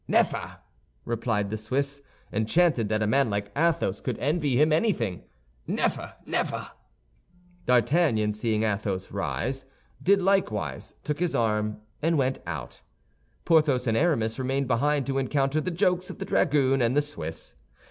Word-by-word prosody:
"Neffer," -, -, +1 dB, 0.5 s
replied 115 Hz, -3 st, -1 dB
the 110 Hz, -, -2 dB
Swiss, 140 Hz, +6 st, -2 dB, 0.3 s
enchanted 115 Hz, +1 st, +2 dB
that 110 Hz, 0 st, +1 dB
a -, -, +2 dB
man 135 Hz, +3 st, +3 dB
like 100 Hz, 0 st, -2 dB
Athos 155 Hz, -, +1 dB
could -, -, -3 dB
envy 145 Hz, -3 st, +1 dB
him 155 Hz, +1 st, +4 dB
anything. 135 Hz, -, 0 dB, 0.4 s
"Neffer, -, -, -1 dB
neffer!" -, -, -2 dB, 1.0 s
D'Artagnan, 125 Hz, -4 st, +3 dB
seeing 110 Hz, 0 st, 0 dB
Athos 100 Hz, -3 st, -2 dB
rise, 135 Hz, +2 st, -2 dB, 0.4 s
did 200 Hz, +2 st, +4 dB
likewise, 110 Hz, -, 0 dB
took 150 Hz, 0 st, -2 dB
his 175 Hz, -1 st, 0 dB
arm, 105 Hz, -2 st, 0 dB, 0.2 s
and 165 Hz, +1 st, +2 dB
went 130 Hz, -1 st, +1 dB
out. -, -, -6 dB, 0.6 s
Porthos 150 Hz, -6 st, +3 dB
and 115 Hz, -2 st, +1 dB
Aramis 115 Hz, -6 st, +1 dB
remained 135 Hz, +1 st, 0 dB
behind 140 Hz, +3 st, +1 dB
to 135 Hz, 0 st, 0 dB
encounter 135 Hz, +2 st, +1 dB
the 180 Hz, -, -2 dB
jokes 180 Hz, +2 st, +1 dB
of -, -, -7 dB
the 195 Hz, -, -5 dB
dragoon 135 Hz, -6 st, +2 dB
and 120 Hz, +3 st, +2 dB
the 145 Hz, -, +4 dB
Swiss. 80 Hz, -, -5 dB
130 Hz, 145 wpm, -27 LUFS, 110-150 Hz, 1.0 s, him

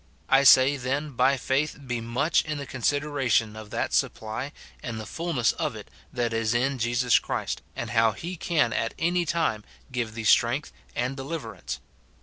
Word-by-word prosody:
I 135 Hz, +1 st, +5 dB
say, 135 Hz, +2 st, +7 dB
then, 140 Hz, +4 st, -2 dB
by 130 Hz, +2 st, +3 dB
faith 135 Hz, +4 st, 0 dB
be 120 Hz, -2 st, -2 dB
much 125 Hz, +8 st, +1 dB
in 155 Hz, -1 st, -4 dB
the 140 Hz, -, -5 dB
consideration 130 Hz, -4 st, 0 dB
of 110 Hz, -1 st, -9 dB
that -, -, -2 dB
supply 110 Hz, +6 st, -1 dB, 0.3 s
and 115 Hz, -2 st, -5 dB
the 110 Hz, -, -6 dB
fulness 150 Hz, -3 st, 0 dB
of -, -, -3 dB
it -, -, -10 dB, 0.2 s
that 120 Hz, -2 st, -1 dB
is 115 Hz, 0 st, 0 dB
in 130 Hz, +2 st, +1 dB
Jesus 120 Hz, +1 st, +3 dB
Christ, -, -, -3 dB
and -, -, -4 dB
how 115 Hz, -2 st, +4 dB
he 175 Hz, -, -6 dB
can 160 Hz, -8 st, +1 dB
at 115 Hz, -, -1 dB
any 170 Hz, +2 st, +1 dB
time 155 Hz, -11 st, 0 dB, 0.3 s
give 120 Hz, -3 st, -3 dB
thee 115 Hz, -, -4 dB
strength 120 Hz, +6 st, +3 dB, 0.2 s
and 125 Hz, +3 st, -1 dB
deliverance. 140 Hz, +4 st, -5 dB
130 Hz, 170 wpm, -26 LUFS, 115-145 Hz, 0.3 s, say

